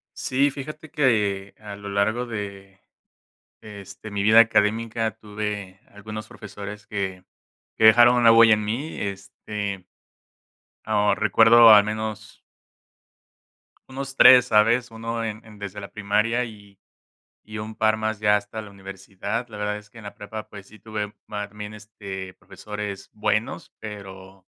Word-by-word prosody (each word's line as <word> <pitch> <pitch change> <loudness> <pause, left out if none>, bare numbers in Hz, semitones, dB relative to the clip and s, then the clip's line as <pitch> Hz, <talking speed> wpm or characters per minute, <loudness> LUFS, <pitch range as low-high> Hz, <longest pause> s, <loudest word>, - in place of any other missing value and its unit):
Sí, 140 +2 +1
fíjate 150 +3 -9
que 105 -9 0
a 105 -1 -9
lo 100 0 -9
largo 110 +5 0
de 100 -3 -7 0.8
este, 100 0 -11
mi 100 -1 -2
vida 110 +2 +7
académica, 110 0 +2
tuve 105 -3 -6
algunos 110 +1 -9
profesores 105 0 -10
que 95 -3 -4 0.5
que 110 - +3
dejaron 120 +2 +7
una 120 -1 +6
huella 115 -1 +7
en 105 0 -4
mí, 130 +9 -4
este 100 0 -5 1.0
ah, 105 0 +2
recuerdo 115 +1 +6
al 105 -1 +9
menos 110 -1 -6 1.5
unos 135 0 -6
3, 125 -2 +8
¿sabes?, 115 +2 +3
1 115 +1 -4
en 110 0 -6
en 105 -2 -15
desde 100 0 -7
la 100 - -9
primaria 105 +4 0
y 100 -3 -14 0.7
y 110 0 -7
un 110 +1 -7
par 110 0 +2
más 110 0 -3
ya 105 -1 +3
hasta 105 +2 -5
la 105 -1 -11
universidad. 100 +3 -6
La 105 - -10
verdad 105 0 -2
es 105 0 -12
que 115 - -16
en 110 - -12
la 100 - -8
prepa, 105 +1 -8
pues, 100 -2 -12
sí 110 +1 -17
tuve 105 -2 -5 0.2
mac 105 -1 -5
bien, 105 0 -7
este, 100 -3 -9
profesores 105 0 -8
buenos, 110 +1 -2
pero, 95 -3 -10
105 Hz, 145 wpm, -24 LUFS, 100-115 Hz, 1.5 s, al